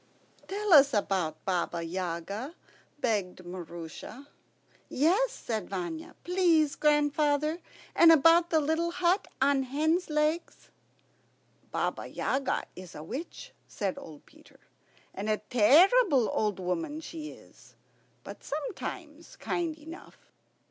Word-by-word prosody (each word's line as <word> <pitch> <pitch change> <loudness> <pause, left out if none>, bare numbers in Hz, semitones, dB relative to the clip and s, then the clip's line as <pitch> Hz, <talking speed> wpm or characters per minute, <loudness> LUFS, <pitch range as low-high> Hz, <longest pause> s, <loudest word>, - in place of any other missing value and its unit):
"Tell 410 -1 0
us 280 -4 +7
about 185 -6 -1
Baba 175 -2 -1
Yaga," 185 - -4 0.4
begged 200 -8 -2
Maroosia. 175 - -9 0.6
"Yes," 380 - +2
said 220 - -5
Vanya, 175 -4 -5
"please, 340 -5 +2
grandfather, 295 +1 +2 0.4
and 335 -1 +8
about 330 +3 +5
the 320 - +3
little 320 +3 0
hut 350 +2 +1
on 275 0 +3
hen's 315 +7 0
legs." 305 +2 -1 1.0
"Baba - - -2
Yaga 270 0 -1
is 185 -2 -11
a 150 - -8
witch," 275 - -7 0.2
said 195 -3 -3
old 155 -2 -12
Peter; - - -21 0.5
"a 215 +2 -1
terrible 290 - +4
old 210 -3 0
woman 180 - -3
she 315 -1 -7
is, - - -17 0.5
but - - -10
sometimes 335 -8 -6
kind 330 -3 -3
enough. 320 +3 -12
285 Hz, 110 wpm, -29 LUFS, -, 1.0 s, and